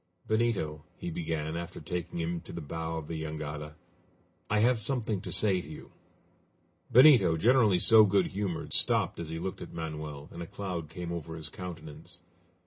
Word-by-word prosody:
"Benito," 105 -10 0
he 85 - -5
began, 80 -1 -3
after 85 0 -5
taking 85 -1 -4
him 85 0 -2
to - - -11
the 85 - -5
bow 80 +1 -4
of 75 -2 -6
the 80 -1 -4
jangada, 75 -1 -5 0.7
"I 105 - +2
have 120 +2 +4
something 110 -4 -2
to - - -6
say 95 -4 +2
to 75 - -12
you." 75 - -10 1.0
Benito, 120 - +7
generally 110 -1 +4
so 110 +4 +7
good 100 -1 +3
humored, 95 -4 -3
stopped - - +2
as 85 -2 -5
he 80 - -4
looked 95 +3 -5
at - - -8
Manoel, 75 -3 -5
and 85 - -8
a 85 - -5
cloud 90 -6 -5
came 85 0 -6
over 80 -1 -5
his 80 -2 -4
countenance. 85 -1 -9
85 Hz, 175 wpm, -30 LUFS, 80-100 Hz, 1.0 s, Benito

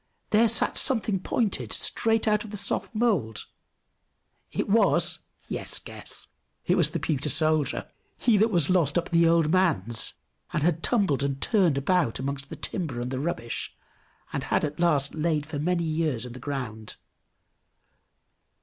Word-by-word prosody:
There 225 +2 +5
sat 225 +1 +1
something 225 -7 +1
pointed, 210 +2 -1
straight 225 -1 +1
out 210 -1 +2
of 215 - -9
the 210 - -6
soft 205 - -2
mould. 195 - 0 1.1
It - - -2
was - - +3 0.3
yes, - - -4
guess! - - -7 0.4
It - - +3
was - - +3
the - - -3
pewter 150 0 -1
soldier, 155 +1 +2 0.3
he 235 - +3
that 220 +3 +4
was 175 -8 +3
lost 175 -6 +2
up 170 - +1
at - - -12
the 170 -1 +4
old 165 -2 +3
man's, 150 - +1 0.4
and 150 - 0
had 165 -1 +1
tumbled 195 - +2
and 140 -1 -1
turned 180 -5 +2
about 160 -3 +1
amongst 135 +1 -4
the - - -6
timber 155 -11 -3
and 125 +1 -4
the 130 - -2
rubbish, 135 -7 -4 0.6
and - - -2
had - - +1
at 150 +1 -6
last 150 -5 +2
laid 155 -2 0
for 145 -1 -5
many 170 +3 0
years 155 -6 -1
in 125 - -8
the 130 - -9
ground. 125 -6 -5
160 Hz, 165 wpm, -26 LUFS, 140-190 Hz, 1.1 s, There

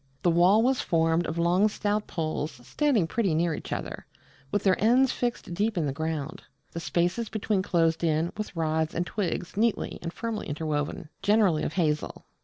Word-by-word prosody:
The 175 - +4
wall 180 +6 +5
was 260 +1 +2
formed 165 0 +1
of 160 - -4
long 175 +5 +3
stout 210 0 -1
poles 155 -2 -3
standing 275 - +2
pretty 190 -2 0
near 165 0 +1
each - - -7
other, - - -5 0.4
with 205 - 0
their 190 0 +2
ends 255 +4 +5
fixed 240 -7 -3
deep 210 +3 0
in 165 - +1
the 140 - -1
ground, 155 0 -3 0.3
the 170 - -5
spaces 180 +6 0
between 210 -2 0
closed 165 -3 +1
in 160 +1 +1
with 215 -3 -5
rods 160 -1 0
and 175 - 0
twigs 180 -2 -3
neatly 225 +2 0
and 170 - -4
firmly 225 +2 -4
interwoven; 150 +2 -3
generally 205 -7 +3
of - - -2
hazel. 155 -4 -1
175 Hz, 180 wpm, -27 LUFS, 160-210 Hz, 0.4 s, wall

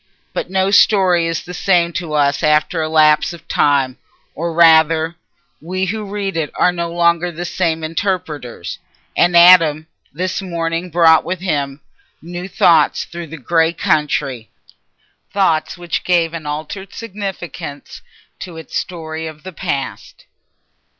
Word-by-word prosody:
But - - -4
no 190 +1 +1
story 185 -5 +4
is 165 -1 -3
the 180 - -9
same 175 -2 +1
to 165 -3 -4
us 145 -1 +1
after 155 +3 +2
a 155 - -2
lapse 155 +1 +4
of 170 - -13
time—or 145 +4 -1
rather, 160 0 +4 0.5
we 185 +4 -2
who 210 +2 -3
read 200 -2 -3
it 160 -3 -1
are 180 - +3
no 170 -1 -4
longer 170 0 +1
the 175 +2 -6
same 165 -3 -1
interpreters—and 165 - -2
Adam 165 -3 +6 0.3
this 185 +5 -3
morning 170 -1 -3
brought 165 -1 +5
with 185 0 -4
him 145 -6 -2 0.4
new 175 +2 -7
thoughts 165 -5 +3
through 170 -1 -8
that 150 -5 -11
grey 165 -1 +2
country, 145 -7 -1 0.8
thoughts 185 -3 +1
which 175 -1 -3
gave 170 -2 +1
an 160 -3 -6
altered 155 +6 -6
significance 190 -9 -7 0.4
to 175 -3 -8
its 160 -4 -10
story 160 -2 -4
of 155 -1 -10
the 190 0 -8
past. 140 -3 -5
165 Hz, 135 wpm, -17 LUFS, 155-180 Hz, 0.8 s, Adam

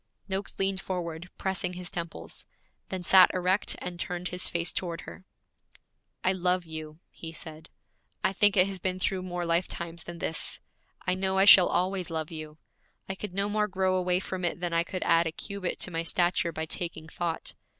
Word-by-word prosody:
Noakes 195 0 -2
leaned 195 0 0
forward, 175 -2 -4
pressing 185 -1 -1
his 180 0 -5
temples; 170 -1 -6 0.4
then 185 -1 -4
sat 185 +1 +8
erect 185 +2 +1
and 175 -1 -6
turned 180 +1 -2
his 180 0 -3
face 170 0 0
toward 170 -2 -2
her. 185 - -11 1.0
'I 185 - +3
love 180 -1 +1
you,' 155 -1 -7
he 165 - -8
said. 160 0 -7 0.5
'I 190 - +2
think 205 +1 +4
it 180 - +8
has 195 -1 -4
been 185 0 0
through 185 0 0
more 180 -1 -3
lifetimes 170 -1 -1
than 175 0 -7
this; 165 -1 -1 0.5
I 180 - +2
know 190 +1 0
I 195 - +6
shall 190 -3 +10
always 185 0 0
love 160 -1 -3
you. 155 -1 -7 0.5
I 190 - -2
could 190 -1 -6
no 200 +1 +2
more 210 0 +1
grow 190 -1 +1
away 180 -1 +2
from 185 -1 -5
it 175 0 0
than 175 -1 -2
I 165 0 +3
could 185 +1 -4
add 165 0 +4
a - - -1
cubit 200 +2 -4
to 185 - -1
my 165 -1 0
stature 175 0 +2
by 160 0 -3
taking 160 -1 -4
thought. 170 0 -3
180 Hz, 190 wpm, -29 LUFS, 170-190 Hz, 1.0 s, shall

